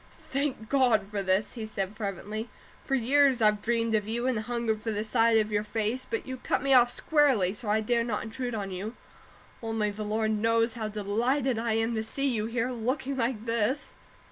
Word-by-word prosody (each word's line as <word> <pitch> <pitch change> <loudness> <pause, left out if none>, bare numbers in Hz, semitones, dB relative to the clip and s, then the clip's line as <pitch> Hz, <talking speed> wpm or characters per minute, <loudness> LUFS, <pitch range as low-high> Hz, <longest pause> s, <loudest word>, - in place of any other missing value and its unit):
"Thank 270 -5 -1
God 240 -6 +3
for 205 -1 -3
this!" 190 +2 +1
he 225 -3 -5
said, 200 -1 -3
fervently. 215 +2 -4 0.3
"For 270 - 0
years 270 +1 +4
I've 210 -2 +3
dreamed 230 0 0
of 210 -1 +1
you 235 +2 -2
and 255 -4 +1
hungered 225 -1 -2
for 225 - -3
the 210 -1 -1
sight 225 0 +3
of 215 -1 +1
your 205 0 +1
face; 220 +4 -2
but 455 - -2
you 260 0 -5
cut 255 - -1
me 275 -1 +3
off 245 -1 +6
squarely, 265 - +2
so 215 0 -6
I 215 +1 +2
dared 235 +1 +1
not 210 -3 -2
intrude 245 +1 -4
on 200 -2 -4
you 200 +6 -5 0.7
only 225 -2 -1
the 210 +1 -8
Lord 215 +1 0
knows 230 +2 +2
how 225 -2 -3
delighted 230 +5 0
I 230 -1 0
am 225 +1 +1
to 220 -1 -1
see 275 +5 0
you 220 -5 0
here, 235 +2 -1
looking 255 +3 -2
like 235 -3 -1
this." 230 +5 0
225 Hz, 205 wpm, -28 LUFS, 215-245 Hz, 0.7 s, off